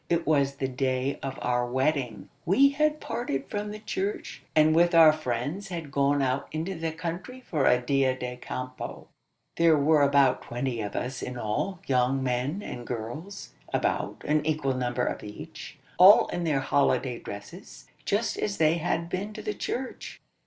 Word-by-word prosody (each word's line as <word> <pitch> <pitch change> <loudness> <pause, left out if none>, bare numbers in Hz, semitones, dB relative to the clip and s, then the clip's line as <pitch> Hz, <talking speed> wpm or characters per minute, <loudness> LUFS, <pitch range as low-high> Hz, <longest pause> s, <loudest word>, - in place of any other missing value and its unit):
It 170 -1 +1
was 140 -3 +2
the 135 -1 -2
day 130 +1 -1
of 135 -1 -5
our 125 0 +1
wedding. 130 0 -1
We 245 +11 +5
had 305 +2 +1
parted 140 - -3
from 210 0 -3
the 210 - -6
church; 205 -1 -4
and 155 0 +5
with 175 +1 +4
our 160 -2 +8
friends 155 +6 -3
had 165 -6 -6
gone 140 0 +2
out 130 +1 -1
into 160 +5 -3
the 165 -2 -3
country 175 +9 -6
for 155 - 0
a 125 - +5
dia 130 +1 +1
de 125 -1 -5
campo. 130 +1 -6 0.5
There 165 -2 +5
were 150 +1 +4
about 140 -2 +4
twenty 120 -1 -3
of 105 -1 -5
us 125 0 -3
in 125 0 -5
all, 165 - -2
young 130 +1 +1
men 130 +9 -1
and 120 -1 -7
girls 125 - -6 0.2
about, - - -1
an 150 0 +2
equal 150 -3 0
number 125 -1 -1
of - - -3
each 105 0 -9 0.2
all 195 +4 +9
in 175 - -2
their 145 -4 +1
holiday 135 -2 +1
dresses, 135 - -10 0.2
just 210 +3 0
as 200 -1 -1
they 160 +1 +3
had 170 0 -1
been 195 +4 -4
to - - -8
the 420 - -2
church. 260 -8 -5
145 Hz, 175 wpm, -27 LUFS, 130-175 Hz, 0.5 s, all